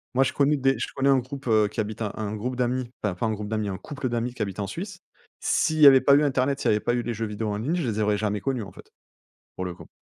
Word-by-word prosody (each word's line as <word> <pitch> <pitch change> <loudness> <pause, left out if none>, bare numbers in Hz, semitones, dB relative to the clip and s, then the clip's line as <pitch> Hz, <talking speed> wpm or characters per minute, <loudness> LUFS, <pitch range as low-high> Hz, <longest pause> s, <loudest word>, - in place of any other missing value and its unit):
Moi 135 - +5
je - - -1
connais 145 +1 +2
des 135 0 +2
je - - -1
connais 135 0 +2
un 135 -1 +5
groupe, 135 +1 -8
heu, 110 -2 +4
qui 105 - -7
habite 110 +1 -6
un 105 -2 -1
un 105 -1 -3
groupe 125 +4 -3
d'amis, 125 0 -1
enfin 100 -4 0
pas 90 - -2
un - - 0
groupe 105 0 -5
d'amis, 110 -2 -1
un 95 - -4
couple 140 +1 -5
d'amis, 120 +1 -2
qui 125 - -8
habitent 100 -1 -3
en 100 - -2
Suisse. 185 - -6 0.4
S'il 155 -2 +1
y 150 - +10
avait 135 -1 +8
pas 140 - +6
eu 145 - +4
internet, 135 0 +1
s'il - - +1
y - - +4
avait 105 - +2
pas - - 0
eu 120 - 0
les 120 - -3
jeux 115 +1 -3
vidéos 105 0 -3
en 105 - -2
ligne, 135 +11 -1
je 170 -7 -1
les 110 -2 -2
aurais 105 -1 +2
jamais 105 -1 -1
connus 130 -2 -1
en 100 - -10
fait, - - -15 0.6
pour 95 - -4
le 90 - -4
coup. - - -13
120 Hz, 315 wpm, -25 LUFS, 105-135 Hz, 0.6 s, y